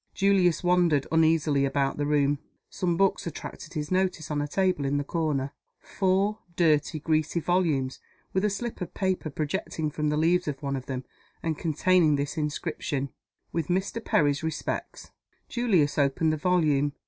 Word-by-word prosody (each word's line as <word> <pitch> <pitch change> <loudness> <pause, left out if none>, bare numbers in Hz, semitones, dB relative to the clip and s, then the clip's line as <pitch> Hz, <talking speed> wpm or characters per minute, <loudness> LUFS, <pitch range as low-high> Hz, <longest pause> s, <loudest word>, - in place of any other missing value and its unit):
Julius 190 -4 +3
wandered 175 -5 +3
uneasily 160 -3 +3
about 140 0 0
the 145 0 -1
room. 145 -1 +2 0.3
Some 175 -2 -1
books 195 -2 +2
attracted 155 +1 -7
his 150 -1 -4
notice 185 -4 0
on 145 -1 0
a 145 - -2
table 185 -2 +1
in 140 +1 0
the 145 - 0
corner 145 -3 -1 0.3
four 195 +3 0 0.2
dirty, 155 -2 +2
greasy 155 +2 0
volumes, 160 -7 0 0.3
with 190 - +1
a 210 - +3
slip 230 +3 -4
of 180 - -5
paper 185 -4 -1
projecting 155 +1 -2
from 150 0 -1
the 150 - 0
leaves 175 +3 +2
of 145 -1 -4
one 140 0 -1
of 130 -1 -6
them, 130 -1 -3 0.4
and 165 -2 0
containing 165 0 +3
this 140 +2 -2
inscription, 150 -2 -2 0.4
"With 165 -3 -2
Mr. 190 +5 -1
Perry's 145 -2 +2
respects." 160 -1 -4 0.4
Julius 180 - +1
opened 145 +3 +2
the - - -1
volume. 150 -4 +2
155 Hz, 160 wpm, -27 LUFS, 145-180 Hz, 0.4 s, Julius